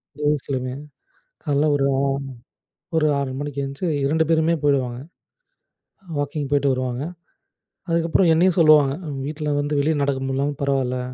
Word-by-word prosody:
இந்த 150 - -9
வயஸ்லமே 130 -3 -2 0.7
காலைல 145 -1 +2
ஒரு 145 -1 +1
ஆ - - +1 1.0
ஒரு 155 -1 +3
6 140 -2 -2
மணிக்கு 145 -1 -4
எந்திச்சி 140 +6 -5 0.2
2 160 +3 +2
பேருமே 160 0 +3
போயிடுவாங்க. 130 -4 +1 1.2
வாக்கிங் 145 0 -2
போய்ட்டு 140 -1 +3
வருவாங்க. 130 0 -2 0.9
அதுக்கப்புறம் 165 +2 +2
என்னையும் 175 +2 +3
சொல்லுவாங்க. 150 -4 +6
அ - - -4 0.2
வீட்டில 150 0 -3
வந்து 145 0 0
வெளிய 155 +3 +1
நடக்க 140 -1 0
முடியல்லனாலும் 135 +2 -2
பரவால்ல. 135 -2 0
145 Hz, 135 wpm, -22 LUFS, 135-155 Hz, 1.2 s, சொல்லுவாங்க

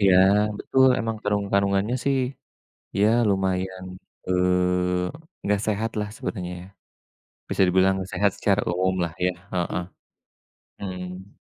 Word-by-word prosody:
Iya, 95 -2 +5 0.4
betul, 130 0 +3
emang 115 -1 -2
kandung 105 -1 0
kandungannya 100 +3 +2
sih 140 -1 +2 0.8
ya 105 - +5 0.2
lumayan, 95 -1 -1 0.4
eee, 90 - 0
nggak 105 0 +1
sehatlah 110 0 -1
sebenarnya 90 -5 -4
ya. 90 - -11 0.8
Bisa - - +1
dibilang 95 +1 +4
nggak 95 0 -5
sehat 100 +2 +2
secara 100 0 +2
umumlah 90 -1 0
ya, 90 - +2 0.2
heeh. 90 0 -1 1.0
Mhm. 90 0 -7
95 Hz, 115 wpm, -24 LUFS, 90-105 Hz, 1.0 s, Iya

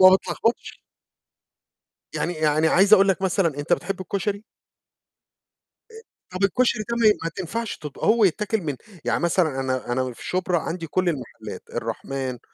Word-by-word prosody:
وما 185 0 +9
بتلخبطش. 230 +4 -2 1.4
يعني 175 - -1
يعني 155 0 +2
عايز 195 +5 +5
أقول 195 -1 +7
لك 190 0 +1
مثلًا، 175 -6 +1
أنت 145 +4 +1
بتحب 195 0 -2
الكشري؟ 200 +2 -3 1.5
آآ 445 0 -11 0.3
طَب 185 +2 -4
الكشري 235 +2 +2
ده 235 - 0
ما 230 -2 +5 0.2
ما 165 - -1
تنفعش 215 +5 -4
تب 150 -2 -9
هو 225 0 +3
يتاكل 210 +4 +1
من 150 -5 -3 0.3
يعني - - +1
مثلًا 165 -5 +1
أنا 130 -2 -2
أنا 130 0 -1
في - - -12
شُبرا 180 -2 0
عندي 165 +1 -4
كل 185 +2 +1
المحلات، 140 -6 -6
الرحمن 130 -2 -4
185 Hz, 155 wpm, -24 LUFS, 155-200 Hz, 1.5 s, وما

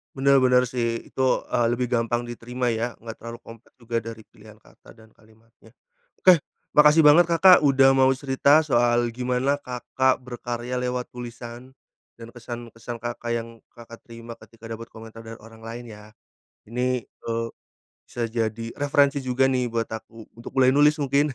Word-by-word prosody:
Benar 135 0 +3
benar 125 0 +4
sih 115 -2 -3
itu, - - -5 0.3
e - - -3 0.2
lebih 125 +1 -1
gampang 120 0 -1
diterima 120 +1 -4
ya 115 0 -2
nggak 115 -1 -9
terlalu 115 0 -9
kompleks 115 0 -15
juga 115 -1 -3
dari 115 -1 -10
pilihan 110 0 -17
kata - - -20
dan 110 -1 -18
kalimatnya, 110 +1 -24 0.5
oke, 185 -1 +7 0.4
makasih 150 +1 +6
banget 170 +3 +6
Kakak 180 +1 +6
udah 135 -1 +5
mau 130 0 +4
cerita 140 +2 +3
soal 120 -5 +2
gimana 125 +2 0
Kakak 130 -1 -1
berkarya 120 0 -6
lewat 125 0 -3
tulisan, 120 +1 -9 0.5
dan 115 - -10
kesan-kesan 120 0 -8
Kakak 120 0 -5
yang 115 -1 -2 0.2
Kakak 115 0 -14
terima 115 0 -11
ketika 115 0 -15
dapat 115 0 -7
komentar 115 0 -12
dari 115 0 -10
orang 110 +1 -16
lain 115 +2 -8
ya. 105 +1 -15 0.6
Ini, 125 0 -2
eee, 115 0 -5 0.6
bisa 120 -1 -4
jadi 115 0 -3
referensi 140 0 +1
juga 130 +1 +1
nih 125 -2 0
buat 115 0 -2
aku 110 0 -10
untuk 115 - -10
mulai 130 0 +5
nulis 150 +1 +4
mungkin. 140 +1 +1
120 Hz, 160 wpm, -24 LUFS, 115-130 Hz, 0.6 s, oke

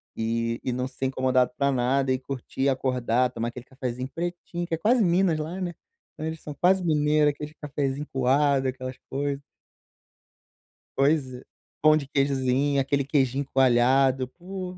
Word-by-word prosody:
e 115 +1 -1
e 130 - -1
não 125 +1 -2
ser 130 0 -3
incomodado 130 -1 +2
para 140 -1 +2
nada 130 +2 +1
e 130 - -1
curtir 135 0 -6
e 140 - +4
acordar, 125 -2 +1
tomar 115 -1 -3
aquele 120 +1 -10
cafezinho 130 -1 -5
pretinho, 175 0 -4
que 170 - -6
é - - +1
quase 225 +5 +3
Minas 175 -2 +3
lá, 165 +5 -4
né? 180 -2 -3 0.4
Então, 155 - -6
eles 160 0 -4
são 150 - -7
quase 185 +5 +3
mineiro, 150 -2 +3
aquele 150 +1 -8
cafezinho 145 -1 -3
coado, 135 +1 +2
aquelas 130 0 -6
coisa. 140 0 -2 1.6
Pois 145 +2 +3 0.6
pão 155 0 +6
de 145 -3 -2
queijinho, 140 0 +1
aquele 140 +1 0
queijinho 135 -1 +1
coalhado, 130 +1 +4
pô. 185 +4 -8
140 Hz, 160 wpm, -26 LUFS, 130-155 Hz, 1.6 s, pão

